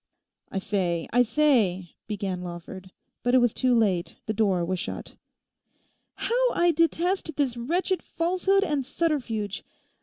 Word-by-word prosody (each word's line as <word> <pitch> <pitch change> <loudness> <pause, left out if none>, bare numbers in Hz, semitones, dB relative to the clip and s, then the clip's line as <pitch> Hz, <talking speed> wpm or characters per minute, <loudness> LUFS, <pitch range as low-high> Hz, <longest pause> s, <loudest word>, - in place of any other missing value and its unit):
'I - - -3
say, 185 -4 -1
I 245 - +5
say,' 225 - +2 0.2
began 195 -4 -3
Lawford; 180 +2 -8 0.3
but 245 +1 +2
it - - +8
was 245 -3 +3
too 255 -2 +2
late, 185 -6 +1
the 215 - -1
door 195 -5 +1
was 185 +1 -2
shut. 210 - -5 1.0
'How - - +1
I 345 0 +3
detest 335 +1 +1
this 275 -5 0
wretched 350 +10 -1
falsehood 370 +4 +1
and 295 -7 0
subterfuge. 250 - -2
240 Hz, 140 wpm, -26 LUFS, -, 1.0 s, it